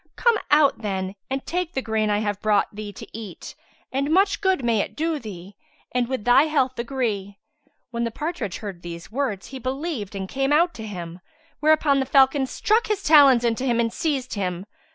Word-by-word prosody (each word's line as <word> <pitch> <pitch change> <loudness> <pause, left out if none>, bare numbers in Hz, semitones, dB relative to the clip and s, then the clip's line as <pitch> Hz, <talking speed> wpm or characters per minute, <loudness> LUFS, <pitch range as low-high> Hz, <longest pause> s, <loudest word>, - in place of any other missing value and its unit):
Come 470 -3 +3
out, 295 -1 +4
then, 190 -3 -3 0.2
and 270 0 -3
take 355 -1 -2
the 265 - -1
grain 220 -1 0
I 205 0 +1
have 205 -2 -2
brought 215 -1 +2
thee 210 0 -6
to 195 - -10
eat 215 -6 -8 0.4
and 275 +2 -1
much 390 +4 +3
good 380 -10 +1
may 230 -2 +2
it - - -3
do 320 0 -1
thee, 195 -4 -9 0.4
and 245 -1 0
with 260 -4 -3
thy 245 +4 +6
health 265 -5 0
agree." 225 -6 -2 0.5
When 235 0 -2
the 230 - 0
partridge 255 - -4
heard 195 -6 -7
these 170 +1 -8
words, 240 -6 -2
he 265 - -7
believed 260 - -4
and 190 -1 -4
came 270 +5 -1
out 340 +4 +4
to 220 -1 -7
him, 175 -3 -7 0.4
whereupon 305 -2 +3
the 265 - -1
falcon 270 0 +4
struck 440 - +1
his 415 -2 -1
talons 280 -6 +7
into 230 +2 0
him 240 -3 +1
and 230 -1 0
seized 280 -6 -2
him. 185 -2 -3
250 Hz, 195 wpm, -23 LUFS, 205-295 Hz, 0.5 s, talons